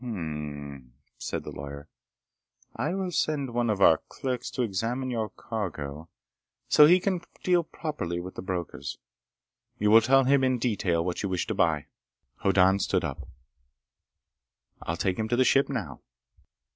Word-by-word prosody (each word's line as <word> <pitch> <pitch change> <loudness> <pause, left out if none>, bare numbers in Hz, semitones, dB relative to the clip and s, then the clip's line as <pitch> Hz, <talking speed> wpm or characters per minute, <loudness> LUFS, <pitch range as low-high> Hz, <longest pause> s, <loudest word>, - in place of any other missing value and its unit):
"Hm 120 -3 -4
m 75 -3 -5
m," 65 -3 -15 0.3
said - - -4
the - - -7
lawyer. 70 +1 -8 0.9
"I 150 +10 -1
will 190 -2 -2
send 140 -7 -1
one 120 -1 +1
of 100 -2 0
our 80 -4 +6
clerks 130 -2 -3
to 125 - -2
examine 120 +5 -2
your 110 -3 -2
cargo 80 -8 -5 0.6
so 150 - +7
he 180 +3 +6
can 185 -2 -1 0.2
deal 180 -2 +3
properly 150 - -4
with 90 +1 -7
the - - -6
brokers. 90 -7 -4 0.8
You 105 0 +2
will 115 +1 +9
tell 135 +4 +5
him 135 +1 +3
in 130 -1 +2
detail 100 -8 0
what 90 -1 -2
you 100 - -2
wish 90 -2 -1
to - - -2
buy." 80 -3 +1 0.5
Hoddan 95 0 +4
stood - - 0
up. - - -5 1.5
"I'll 80 - -3
take 95 +2 -1
him 110 - 0
to 120 - +1
the 130 +1 +3
ship 135 +2 +4
now." 100 - -4
105 Hz, 165 wpm, -27 LUFS, 85-130 Hz, 1.5 s, will